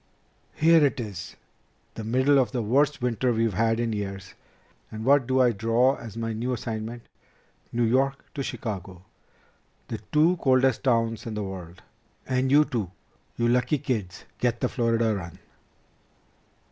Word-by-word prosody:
"Here 165 0 +5
it 140 -2 +1
is, 100 -5 -6 0.6
the 110 - -7
middle 130 +5 +3
of 130 - +1
the 125 -3 -2
worst 140 +4 +1
winter 125 +1 +1
we've 115 -2 +1
had 115 +4 +1
in 115 -1 -1
years, 100 -2 -5 0.6
and 110 +1 -6
what 135 -2 +4
do 130 0 +2
I 125 -2 +5
draw 115 +5 +2
as 115 -1 -10
my 115 -1 -2
new 120 +4 -2
assignment? 115 0 -5 0.7
New 120 0 0
York 135 +4 +1
to 140 - -4
Chicago! 95 -8 -5 0.9
The - - -4
two 160 +4 +4
coldest 130 -4 +2
towns 115 -3 +1
in 110 - -4
the 105 - -2
world! 90 -2 -8 0.4
And 130 0 0
you 150 +2 +6
two, 115 - -3 0.5
you 120 - +1
lucky 125 +5 +2
kids, 110 -10 -4
get 120 -1 0
the 125 - 0
Florida 115 -2 +1
run!" 85 -5 -6
120 Hz, 155 wpm, -26 LUFS, 110-130 Hz, 0.9 s, you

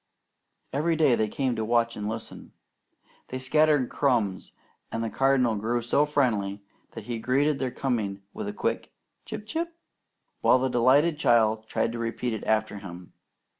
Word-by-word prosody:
Every 160 +4 +1
day 155 -5 +4
they 110 -2 +1
came 130 +2 -1
to 110 - -2
watch 115 +1 +1
and 105 0 -4
listen. 110 +1 -7 0.7
They 130 - -5
scattered 145 0 +3
crumbs; 115 -9 0 0.4
and 115 - -2
the 115 - -3
Cardinal 135 -4 +2
grew 115 +3 -1
so 145 +5 +2
friendly 105 -9 0 0.3
that - - -7
he 120 -2 -4
greeted 135 +5 +1
their 130 - -1
coming 110 -7 -2
with - - -5
a - - -2
quick - - -2 0.3
"Chip! 210 - -7
Chip!" 330 +8 -3 0.6
while - - +5
the 130 +1 0
delighted 140 +6 +3
child 110 -4 +3
tried 115 - 0
to 115 - -5
repeat 115 +1 -2
it 110 - -5
after 110 -1 0
him. 90 -2 -10
120 Hz, 165 wpm, -27 LUFS, 110-135 Hz, 0.7 s, while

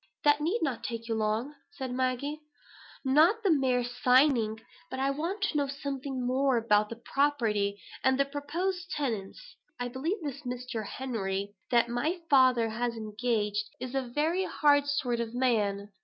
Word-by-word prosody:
"That 290 0 +4
need 345 +8 0
not 265 -7 -2
take 230 -1 -4
you 230 - -1
long," 220 +5 -1 0.2
said 265 -6 -5
Maggie. 260 +4 -1 0.6
"Not 325 - +4
the 390 - +4
mere 260 -4 +2
signing. 245 -2 +3 0.3
But 260 - -5
I 270 +1 +2
want 340 +8 -3
to 405 -7 +1
know 285 -1 +1
something 275 -2 -4
more 260 0 +2
about 210 -2 +3
the 230 - -5
property, 230 -6 0 0.2
and 265 0 +3
the 275 - +4
proposed 340 +6 -3
tenants. 265 - -4 0.2
I 245 0 -2
believe 290 - -2
this 280 -1 -5
Mr. 250 -4 -4
Henry 205 -6 -3 0.2
that 235 -1 +4
my 285 +10 -1
father 255 -4 +5
has 235 +1 -2
engaged, 215 -1 -1
is 255 0 -5
a 270 - +1
very 305 +9 0
hard 285 -3 +3
sort 255 -5 0
of 235 0 -3
man. 210 -5 +1
255 Hz, 160 wpm, -29 LUFS, 230-290 Hz, 0.6 s, father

